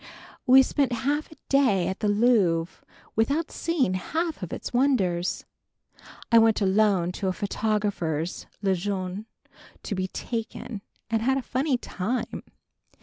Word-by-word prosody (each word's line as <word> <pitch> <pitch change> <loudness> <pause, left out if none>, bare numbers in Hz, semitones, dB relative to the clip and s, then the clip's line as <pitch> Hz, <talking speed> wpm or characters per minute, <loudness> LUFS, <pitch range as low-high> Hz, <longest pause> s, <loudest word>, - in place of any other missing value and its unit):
We 265 +1 +8
spent 270 -1 0
half 295 +3 0
a - - -12
day 250 -11 +3
at 190 - -3
the 210 - 0
Louvre 205 -7 +2 0.3
without 280 +9 +1
seeing 315 - 0
half 320 - -2
of 180 - -5
its - - -5
wonders. 200 -10 +1 0.9
I 230 - +8
went 225 -1 +4
alone 195 -3 +2
to 190 +2 -3
a 185 - +1
photographer's, 200 -6 -2 0.2
Le 195 -1 +3
Jeune, 190 +2 -3 0.6
to - - -3
be 185 -1 -1
"taken" 225 0 -5 0.3
and 225 -1 +1
had 265 +3 +2
a 270 - -2
funny 260 +2 0
time. 235 +2 -3
215 Hz, 140 wpm, -26 LUFS, 185-255 Hz, 0.9 s, We